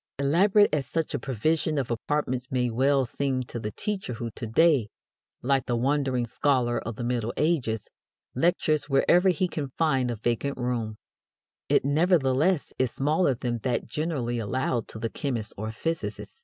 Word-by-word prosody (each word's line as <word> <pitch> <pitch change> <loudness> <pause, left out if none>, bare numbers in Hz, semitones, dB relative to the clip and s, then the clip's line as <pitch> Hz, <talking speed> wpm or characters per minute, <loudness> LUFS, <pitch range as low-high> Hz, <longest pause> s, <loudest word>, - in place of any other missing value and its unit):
Elaborate 185 +8 +4
as 140 -4 0
such 160 +4 -2
a - - -1
provision 155 +5 0
of 130 -4 -1
apartments 130 +1 -1
may 125 -3 0
well 135 +3 +2
seem 130 +1 -1
to 120 - -6
the 105 - -3
teacher 190 - -4
who 115 0 -5
to 115 - -6
day, 130 -2 +3 0.5
like 135 0 +1
the 120 - +1
wandering 130 0 +1
scholar 125 0 +1
of 115 0 -6
the 120 - -5
Middle 120 -1 -1
Ages, 130 -10 0 0.5
lectures 155 0 +1
wherever 175 +7 +4
he 180 +1 +1
can 150 -5 -4
find 135 -6 +2
a 120 - -2
vacant 120 +5 -1
room, 120 -3 -2 0.7
it - - +3
nevertheless 150 +1 +2
is 130 -1 +2
smaller 145 +3 +1
than 120 0 -3
that 120 0 -1
generally 125 -4 -2
allowed 120 +1 -1
to - - -8
the 115 +1 -2
chemist 120 -7 -3
or 110 +2 -4
physicist. 110 -3 -4
130 Hz, 165 wpm, -27 LUFS, 120-150 Hz, 0.7 s, Elaborate